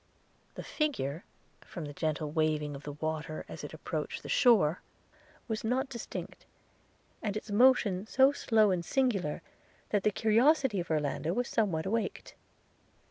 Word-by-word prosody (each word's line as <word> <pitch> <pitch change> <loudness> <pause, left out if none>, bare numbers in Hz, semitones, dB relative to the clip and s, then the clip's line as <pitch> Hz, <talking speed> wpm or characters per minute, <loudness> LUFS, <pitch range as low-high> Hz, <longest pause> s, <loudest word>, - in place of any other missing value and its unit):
– - - -37
The - - -6
figure, 180 - -2 0.4
from 170 -4 -7
the 145 - -7
gentle 155 0 -2
waving 155 -2 0
of 140 - -8
the 145 -1 -7
water 155 +1 -4
as - - -9
it - - -6
approached - - -5
the - - -8
shore, 200 - +4 0.7
was 220 -2 -3
not 260 +4 0
distinct; 235 -3 -7 0.7
and 210 -2 -2
its 215 - -7
motion 215 -4 +4
so 265 +3 +5
slow 220 -7 +3
and 180 -2 0
singular, 200 - 0 0.5
that 205 - +2
the 210 - +3
curiosity 230 +2 +3
of 175 - -4
Orlando 155 +1 -1
was 245 +4 -1
somewhat 185 -8 0
awaked. 225 +3 -2
200 Hz, 150 wpm, -31 LUFS, 155-235 Hz, 0.7 s, so